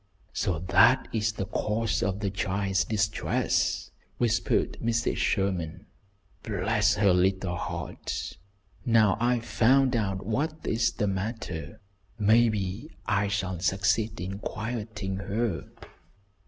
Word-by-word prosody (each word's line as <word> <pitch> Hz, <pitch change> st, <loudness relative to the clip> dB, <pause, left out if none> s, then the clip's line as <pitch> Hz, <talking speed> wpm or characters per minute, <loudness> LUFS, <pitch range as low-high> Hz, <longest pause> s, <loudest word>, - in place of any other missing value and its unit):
"So 95 Hz, -6 st, 0 dB
that 100 Hz, +9 st, +4 dB
is 110 Hz, -1 st, 0 dB
the 95 Hz, -, -3 dB
cause 110 Hz, +2 st, -1 dB
of 100 Hz, -3 st, -1 dB
the 100 Hz, -2 st, -1 dB
child's 95 Hz, -1 st, 0 dB
distress," 105 Hz, -3 st, 0 dB, 0.3 s
whispered 120 Hz, -3 st, +1 dB
Mrs. 115 Hz, 0 st, 0 dB
Sherman. 95 Hz, -5 st, -1 dB, 0.6 s
"Bless 105 Hz, 0 st, +1 dB
her 100 Hz, -3 st, +4 dB
little 95 Hz, 0 st, +1 dB
heart, -, -, -5 dB, 0.5 s
now 110 Hz, -5 st, +4 dB
I've 120 Hz, -1 st, +1 dB
found 125 Hz, +4 st, +3 dB
out 95 Hz, -4 st, -1 dB
what 145 Hz, +8 st, -1 dB
is 115 Hz, +1 st, +1 dB
the 105 Hz, -, -1 dB
matter, 95 Hz, -5 st, -4 dB, 0.4 s
maybe 110 Hz, +2 st, +2 dB, 0.2 s
I 100 Hz, 0 st, +1 dB
can 95 Hz, -3 st, -2 dB
succeed 95 Hz, +4 st, +1 dB
in 95 Hz, +2 st, -4 dB
quieting 110 Hz, -3 st, -4 dB
her." 100 Hz, 0 st, -2 dB
105 Hz, 115 wpm, -28 LUFS, 95-115 Hz, 0.6 s, that